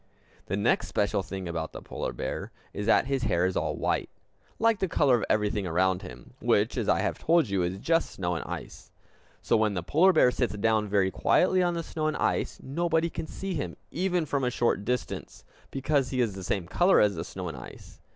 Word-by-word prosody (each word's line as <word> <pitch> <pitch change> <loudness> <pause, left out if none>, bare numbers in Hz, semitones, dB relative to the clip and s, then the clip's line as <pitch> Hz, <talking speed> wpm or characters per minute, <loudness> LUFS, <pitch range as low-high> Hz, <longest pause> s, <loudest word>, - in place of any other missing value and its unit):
The 100 - -1
next 100 - +1
special 100 -1 0
thing 95 0 -6
about 80 -2 -4
the - - -6
polar - - -4
bear - - -5 0.2
is 105 - -4
that 115 - +4
his 135 -1 -1
hair 90 -7 +1
is 95 - -1
all - - -1
white - - -1 0.5
like 225 -2 +2
the 190 - +1
color 145 -6 +3
of - - -4
everything 105 -2 +1
around 90 +2 +1
him, 60 - -11
which, - - +2
as - - -1
I - - +3
have - - -2
told 165 -6 +3
you, 100 -2 +1
is 90 +2 -1
just 165 +11 +1
snow 90 -2 -3
and 80 - -3
ice. - - -8 0.5
So - - +2
when 110 -2 +2
the 90 - -2
polar 170 - +4
bear 125 - +5
sits 125 -4 -1
down 110 0 +2
very 100 -2 +2
quietly 185 - +3
on 175 -1 +1
the 170 - -2
snow 155 -1 -3
and 155 - -1
ice, - - -1
nobody 165 +3 0
can 160 - -5
see 195 -1 -5
him - - -4
even 180 -1 0
from 140 -2 -1
a 125 - +2
short 120 -4 0
distance, 125 +1 -4 0.2
because 135 -1 0
he 130 - -2
is 115 -5 +1
the 95 -1 -7
same 90 0 -1
color 180 - +4
as 105 -1 +4
the 80 -2 -4
snow 90 +1 -6
and 80 - -6
ice. - - -12
115 Hz, 220 wpm, -28 LUFS, 95-160 Hz, 0.5 s, bear